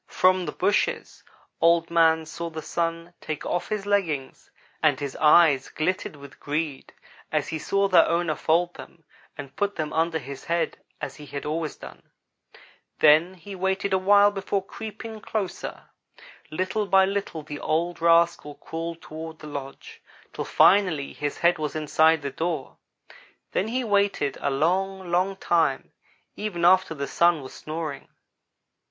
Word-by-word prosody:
From 185 -1 +2
the - - -2
bushes 200 +3 -1 0.4
Old 170 0 +3
man 160 -1 +4
saw 170 +1 -6
the 160 -1 -7
Sun 165 +1 -3
take 155 -2 -5
off 175 - -2
his 210 -2 -2
leggings 170 -10 -1 0.3
and - - +3
his 140 -2 -5
eyes 150 -3 +5
glittered 180 +1 -2
with 140 -1 -13
greed 150 -1 -3 0.4
as - - 0
he 160 - -3
saw 200 +5 +1
their 185 - +5
owner 170 -1 +1
fold 170 +3 +1
them 165 - -13 0.3
and 140 -2 -9
put 205 0 -1
them 155 -2 -3
under 160 +1 +1
his 140 -2 -8
head 170 0 -1 0.2
as - - -6
he 150 -1 -11
had 140 +1 -6
always 155 0 -2
done. - - -12 1.0
Then 160 +5 +5
he 185 +3 -10
waited 190 +1 -1
a 190 - +3
while 205 +2 +5
before 195 -1 -2
creeping 220 +1 -8
closer. 205 -4 -4 0.7
Little 185 +6 -2
by 190 0 +5
little 195 -5 -3
the 145 0 -7
old 170 +2 -1
rascal 170 -3 +3
crawled 165 0 -6
toward 160 +1 -8
the 155 - -12
lodge, 140 -2 -8 0.3
till - - -4
finally 180 -8 +3
his 145 -1 -4
head 170 -1 +3
was 150 0 -3
inside 155 0 +3
the 140 - -3
door. 160 -4 -3 0.7
Then 195 - 0
he 250 +3 -1
waited 200 - +1
a - - 0
long, 185 +6 0
long 185 +3 +1
time, 165 -7 0 0.4
even 180 -5 -2
after 185 -2 +4
the 140 -1 -3
Sun 170 -1 +2
was 130 - -10
snoring. 155 -2 -6
170 Hz, 155 wpm, -25 LUFS, 155-190 Hz, 1.0 s, eyes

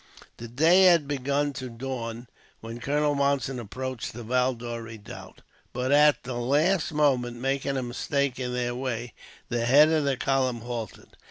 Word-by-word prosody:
The 120 - -8
day 165 +10 +5
had 170 -5 +5
begun 140 +1 -1
to 130 -1 -6
dawn 120 -1 -6 0.3
when 115 +1 -8
Colonel 145 +3 0
Monson 140 -2 0
approached 130 +3 -5
the 120 +1 -8
Valdore 120 -1 -1
redoubt. 110 -2 -11 0.3
But 125 +2 -2
at 145 -2 +5
the 130 - -5
last 155 +9 +1
moment, 130 -6 +1
making 135 +2 -1
a 130 - -2
mistake 135 +2 -2
in 125 -1 -3
their 125 -1 -2
way, 120 -2 -4 0.4
the 120 -1 -1
head 145 +5 +7
of 160 -2 +2
the 140 -2 0
column 130 -3 0
halted. 120 -2 -6
130 Hz, 160 wpm, -26 LUFS, 120-140 Hz, 0.4 s, head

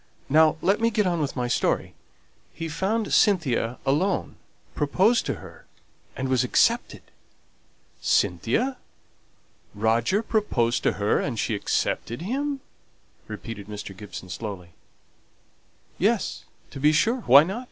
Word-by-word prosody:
Now 155 +2 +5
let 200 +4 +2
me 230 - +3
get 215 -2 +1
on 175 -3 0
with 145 - -2
my 125 -2 -1
story: 120 - 0 0.6
he 165 - -6
found 195 +8 -1
Cynthia 135 - +2
alone, 165 +8 0 0.4
proposed 190 +11 +2
to - - -1
her, - - -13 0.5
and 130 - -3
was 130 -1 +2
accepted." 125 - +1 1.0
"Cynthia? 115 - +1 1.0
Roger 115 - +1
proposed 125 - 0
to - - +1
her, 105 0 +1
and 125 -5 -3
she 110 - -1
accepted 115 +5 -2
him?" 275 +6 -2 0.7
repeated 110 -4 -8
Mr. 105 -2 -7
Gibson, 95 -2 -9
slowly. 90 -2 -6 1.3
"Yes, - - 0 0.3
to 135 - -8
be 150 +3 +4
sure. 230 +11 +2
Why 140 +4 +9
not? 190 +8 -4
145 Hz, 125 wpm, -25 LUFS, -, 1.3 s, Why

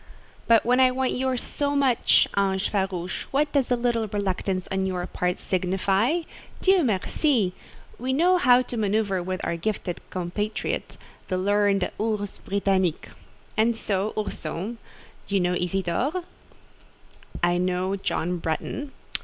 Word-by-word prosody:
"But 230 -1 +5
when 250 +2 +3
I 260 -1 +7
want 260 0 0
yours 260 -1 -1
so 285 0 -1
much, 270 -4 +4
ange 195 -1 +1
farouche, 190 -3 -2
what 290 +2 +1
does 275 -3 +1
a 250 - +4
little 235 -2 0
reluctance 190 -2 -2
on 190 0 0
your 180 -1 -2
part 180 0 -1
signify? 195 - +1 0.4
Dieu 380 -2 +4
merci! 220 - +1 0.5
we 255 +3 -1
know 350 +7 +4
how 250 -5 +6
to 245 - -6
manoeuvre 205 -3 +1
with 185 +1 -3
our 170 - -1
gifted 180 0 -3
compatriote—the 185 0 -4
learned 200 0 +2
'ourse 210 -2 -2
Britannique.' 190 -4 0 0.5
And 225 +1 +2
so, 200 -1 -1
Ourson, 210 +2 -4 0.5
you 200 -1 +1
know 180 0 +1
Isidore?" 190 - -1 1.2
"I 175 0 +3
know 185 +1 0
John 180 -2 -2
Bretton." 265 - -3
200 Hz, 130 wpm, -25 LUFS, 185-245 Hz, 1.2 s, I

